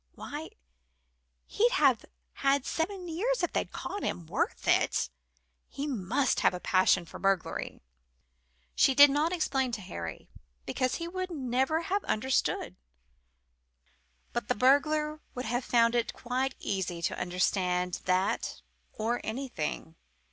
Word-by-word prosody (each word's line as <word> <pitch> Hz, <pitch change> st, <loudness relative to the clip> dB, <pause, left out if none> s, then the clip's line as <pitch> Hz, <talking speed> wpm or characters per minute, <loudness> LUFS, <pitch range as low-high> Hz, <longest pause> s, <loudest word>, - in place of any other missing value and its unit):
Why, -, -, -6 dB, 1.0 s
he'd 475 Hz, +3 st, +2 dB
have 270 Hz, -, +3 dB, 0.3 s
had 275 Hz, -1 st, +1 dB
seven 360 Hz, +2 st, -2 dB
years 395 Hz, +7 st, -1 dB
if 350 Hz, -, 0 dB
they'd -, -, -1 dB
caught 405 Hz, -, -5 dB
him 170 Hz, -, -3 dB
worth 160 Hz, -, -2 dB
it? -, -, +2 dB, 0.6 s
He 280 Hz, -, -4 dB
must 255 Hz, +1 st, 0 dB
have -, -, +3 dB
a -, -, -5 dB
passion 185 Hz, -1 st, +3 dB
for -, -, -10 dB
burglary." 195 Hz, -, -1 dB, 0.9 s
She 270 Hz, -, +4 dB
did 285 Hz, +1 st, +9 dB
not 300 Hz, +4 st, +1 dB
explain 270 Hz, -7 st, 0 dB
to 220 Hz, -, -3 dB
Harry, 85 Hz, -, -7 dB, 0.4 s
because 255 Hz, 0 st, 0 dB
he 335 Hz, -, -4 dB
would 370 Hz, +1 st, -4 dB
never 265 Hz, 0 st, 0 dB
have 390 Hz, +4 st, -1 dB
understood. 260 Hz, +5 st, 0 dB, 1.6 s
But 240 Hz, -3 st, -2 dB
the -, -, +1 dB
burglar 300 Hz, +5 st, +3 dB
would 250 Hz, -, -4 dB
have 245 Hz, +3 st, -1 dB
found 230 Hz, -1 st, +3 dB
it 240 Hz, -1 st, 0 dB
quite 255 Hz, +2 st, -2 dB
easy 185 Hz, -4 st, -3 dB
to -, -, -1 dB
understand 180 Hz, 0 st, 0 dB
that 185 Hz, +2 st, 0 dB, 0.3 s
or 230 Hz, +3 st, -1 dB
anything. 220 Hz, -, -4 dB
255 Hz, 135 wpm, -30 LUFS, 195-305 Hz, 1.6 s, did